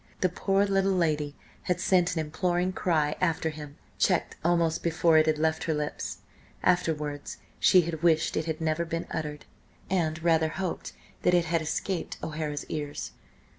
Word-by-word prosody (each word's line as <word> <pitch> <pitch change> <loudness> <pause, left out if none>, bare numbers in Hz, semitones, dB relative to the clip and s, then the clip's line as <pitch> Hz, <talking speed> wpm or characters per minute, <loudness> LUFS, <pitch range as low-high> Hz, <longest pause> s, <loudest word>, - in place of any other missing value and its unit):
The 185 - +3
poor 195 +3 +1
little 195 -1 +2
lady 150 -4 0 0.3
had 180 -1 +2
sent 180 -1 +2
an - - 0
imploring 175 +4 0
cry 155 -5 +1
after 165 -2 +1
him, 150 -2 -9 0.2
checked - - +2
almost 170 -1 +2
before 165 -1 +4
it 155 - +3
had 155 -1 +2
left 160 +1 0
her 160 - 0
lips. 150 0 -4 0.4
Afterwards 150 -5 0 0.2
she 180 -3 +5
wished 165 -2 +3
it 155 - 0
had 160 -1 -3
never 160 +1 +1
been 165 0 -3
uttered, 150 -2 -4 0.5
and 165 -3 0
rather 160 -2 +3
hoped 185 +1 -4 0.3
that 180 - +4
it 175 -1 +3
had 165 0 +1
escaped 170 +3 -3
O'Hara's 150 -2 -3
ears. 145 -2 -4
160 Hz, 160 wpm, -28 LUFS, 155-175 Hz, 0.5 s, she